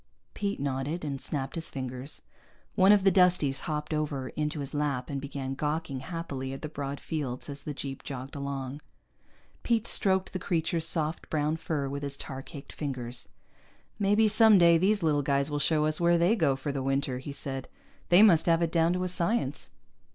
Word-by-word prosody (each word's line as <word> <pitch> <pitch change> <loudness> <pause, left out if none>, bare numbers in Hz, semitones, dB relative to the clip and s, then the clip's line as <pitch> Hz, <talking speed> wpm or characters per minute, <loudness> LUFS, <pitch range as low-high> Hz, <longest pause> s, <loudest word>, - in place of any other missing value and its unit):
Pete 200 0 -2
nodded, 140 +4 -2
and 140 -2 -4
snapped 135 -3 -2
his 165 -1 -4
fingers. 130 +1 -4 0.5
One 190 0 +6
of 205 -2 +5
the 195 - +5
Dusties 180 -7 +3
hopped 150 0 -2
over 145 -4 -2
into 150 0 -3
his 140 +1 -5
lap 145 -3 -1
and 140 -1 -3
began 135 -1 -4
gawking 150 -1 -2
happily 135 -3 -5
at 135 - -8
the - - -2
broad 140 -2 -5
fields 140 -6 -4
as 140 0 -6
the 150 - -4
jeep 135 -1 -5
jogged 135 0 -7
along. 140 0 -4 0.8
Pete 230 -2 +1
stroked 190 -3 +2
the 185 - -2
creature's 165 -2 0
soft 160 -1 -1
brown 155 0 0
fur 155 -3 -2
with 140 +1 -4
his 140 -1 -3
tar 135 -1 -6
caked 140 +1 -10
fingers. 125 -4 -4 0.7
"Maybe 205 +2 +4
someday 200 -6 +6
these 200 +1 +2
little 150 -2 +2
guys 140 +1 0
will 145 - -1
show 155 +1 +2
us 155 +2 +1
where 170 0 +4
they 175 +6 +3
go 140 - +2
for 135 +2 -4
the 140 -1 -3
winter," 135 -1 -1
he 140 +2 -7
said. 135 -1 -5 0.4
"They 180 +4 +8
must 175 -7 +5
have 165 0 +4
it 165 - 0
down 165 0 +3
to 180 0 -1
a - - 0
science." 175 - -1
150 Hz, 190 wpm, -29 LUFS, 135-170 Hz, 0.8 s, They